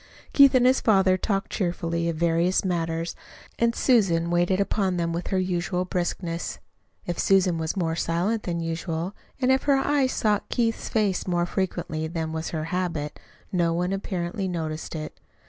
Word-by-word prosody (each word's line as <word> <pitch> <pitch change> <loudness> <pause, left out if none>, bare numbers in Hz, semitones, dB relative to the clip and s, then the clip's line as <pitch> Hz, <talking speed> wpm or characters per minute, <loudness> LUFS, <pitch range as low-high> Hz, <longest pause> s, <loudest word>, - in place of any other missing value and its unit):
Keith 275 -2 +7
and 250 -1 +5
his 260 +1 +4
father 190 -4 +4
talked 195 +1 -2
cheerfully 170 -3 -1
of 165 - -2
various 170 +3 +2
matters, 165 -2 -1 0.4
and 235 0 +2
Susan 175 -9 +3
waited 175 +2 +2
upon 195 -2 0
them 170 -1 -1
with 170 +1 -3
her 190 - 0
usual 180 0 -1
briskness. 175 -1 -3 0.5
If 175 - -3
Susan 185 -3 +3
was 160 +4 -2
more 165 -3 0
silent 175 +7 0
than 170 -3 -3
usual, 165 +2 -3 0.2
and 260 -1 +3
if 265 0 +3
her 280 -2 +4
eyes 270 -1 +2
sought 210 -2 0
Keith's 230 -2 0
face 205 -5 0
more 175 -1 +1
frequently 165 -4 -2
than 160 -1 -3
was 160 0 -3
her 155 -2 -3
habit, 165 -5 -2 0.3
no 170 -2 +1
one, 180 +2 0
apparently, 190 0 -3
noticed 160 -3 -4
it. 155 -1 -6
180 Hz, 165 wpm, -25 LUFS, 165-195 Hz, 0.5 s, Keith